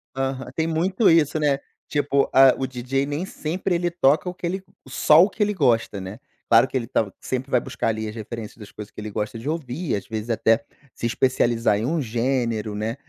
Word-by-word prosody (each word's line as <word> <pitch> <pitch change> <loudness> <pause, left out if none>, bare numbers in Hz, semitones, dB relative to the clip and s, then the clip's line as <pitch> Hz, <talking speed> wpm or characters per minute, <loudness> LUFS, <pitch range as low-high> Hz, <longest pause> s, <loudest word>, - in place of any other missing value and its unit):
Aham, 135 -1 -3
tem 160 - 0
muito 185 +6 +2
isso, 160 -2 +3
né. 140 -2 +2 0.3
Tipo, 145 -1 +1
a, 135 0 +7
o 135 - -1
DJ 130 +2 -2
nem 145 +6 -3
sempre 180 +2 -2
ele 175 0 0
toca 155 0 +2
o - - -6
que 180 - -7
ele 190 +2 -3 0.2
só 150 +4 +5
o 200 - +2
que 210 - -1
ele 210 0 0
gosta, 120 - +1
né. 95 +5 -8 0.3
Claro 115 +3 +6
que 130 - -2
ele 115 -2 -3
tá 105 -5 0
sempre 130 +1 -4
vai 125 - +4
buscar - - -4
ali 110 0 -2
as 105 - -7
referências 110 0 -7
das 105 -2 -12
coisas 105 -1 -9
que - - -9
ele 105 - -5
gosta 105 +2 -3
de 130 +7 -5
ouvir, 155 -1 -2
às 100 - -5
vezes 110 +1 -5
até 115 +3 +2 0.3
se - - -5
especializar 120 -3 +2
em 110 - -2
um 160 +2 0
gênero, 115 -2 -1
né, 110 +3 -2
130 Hz, 220 wpm, -23 LUFS, 115-155 Hz, 0.3 s, a